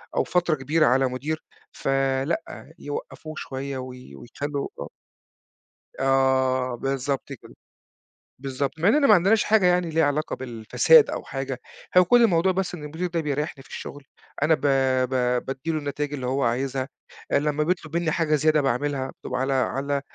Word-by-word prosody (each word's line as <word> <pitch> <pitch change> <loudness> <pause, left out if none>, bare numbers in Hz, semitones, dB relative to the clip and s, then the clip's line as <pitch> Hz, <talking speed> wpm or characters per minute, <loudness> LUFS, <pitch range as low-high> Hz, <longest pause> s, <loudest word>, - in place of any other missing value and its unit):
أو - - +2
فترة 175 -3 +1
كبيرة 155 +3 +1
على 130 +2 +3
مدير، 145 +5 -4 0.3
فلأ 135 +4 -2
يوقّفوه 150 +2 -7
شوية 135 0 -5
وي 125 - -9
ويخلّوا 140 - -5
آه. - - -6 1.1
آه 130 -1 +2
بالضبط 135 +2 -2
كده، - - -14 0.9
بالضبط، 140 +3 -3
مع 170 - +2
إننا 280 +5 +4
ما 215 - +8
عندناش 200 +4 +4
حاجة 215 -4 +3
يعني 180 -1 +3
ليها 160 -1 +2
علاقة 145 +2 -1
بالفساد 130 - +4
أو - - -4
حاجة، - - -5 0.4
هو 180 - +8
كلّ 240 +5 +5
الموضوع 185 -3 +3
بس 185 -1 -2
إن 155 - -10
المدير 160 +5 -3
ده 170 -1 -2
بيريّحني 150 -1 -3
في - - -20
الشغل، 145 0 -8 0.4
أنا 160 +1 +4
ب - - -15 0.5
ب 125 -1 0
بادِّي 135 +5 -3
له 155 - -1
النتايج 145 0 -3
اللي 130 -3 -4
هو 135 +2 0
عايزها، 130 +2 -1 0.4
لمّا 150 +1 +1
بيطلُب 165 -1 -2
منّي 170 -1 0
حاجة 155 -1 +1
زيادة 155 +1 +3
باعملها 135 0 -1
وعلى 135 +1 -1
على 140 +2 0
145 Hz, 160 wpm, -24 LUFS, 130-160 Hz, 1.1 s, ما